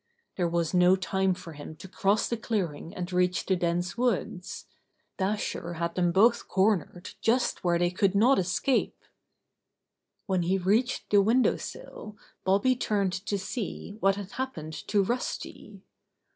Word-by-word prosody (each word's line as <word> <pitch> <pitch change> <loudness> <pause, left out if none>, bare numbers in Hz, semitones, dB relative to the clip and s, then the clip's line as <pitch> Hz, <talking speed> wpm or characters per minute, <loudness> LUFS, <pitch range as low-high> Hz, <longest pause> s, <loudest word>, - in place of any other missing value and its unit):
There 175 -2 0
was 170 -1 -1
no 180 +1 +5
time 190 0 0
for 170 -3 -10
him 150 +1 -9
to 175 - -11
cross 200 +2 +1
the 235 - -1
clearing 190 -9 -3
and 180 0 -5
reach 180 0 +1
the 190 - +2
dense 175 +4 -1
woods. 205 -7 -2 0.5
Dasher 190 -3 -2
had 170 0 -2
them 175 -1 +1
both 225 +7 +4
cornered 190 -2 0
just 240 +2 +1
where 175 -1 +2
they 175 0 +1
could 195 +1 +1
not 240 +5 +5
escape. 185 +9 0 1.3
When 190 -3 0
he 180 +3 +1
reached 215 +8 0
the 205 -1 +6
window 235 +6 +3
sill 215 -1 -9 0.3
Bobby 200 +7 +3
turned 200 -6 0
to 205 - 0
see 200 +1 -5
what 195 -1 +3
had 200 -1 -7
happened 165 -13 -5
to 205 -2 +3
Rusty. 240 +6 -4
190 Hz, 150 wpm, -28 LUFS, 175-210 Hz, 1.3 s, the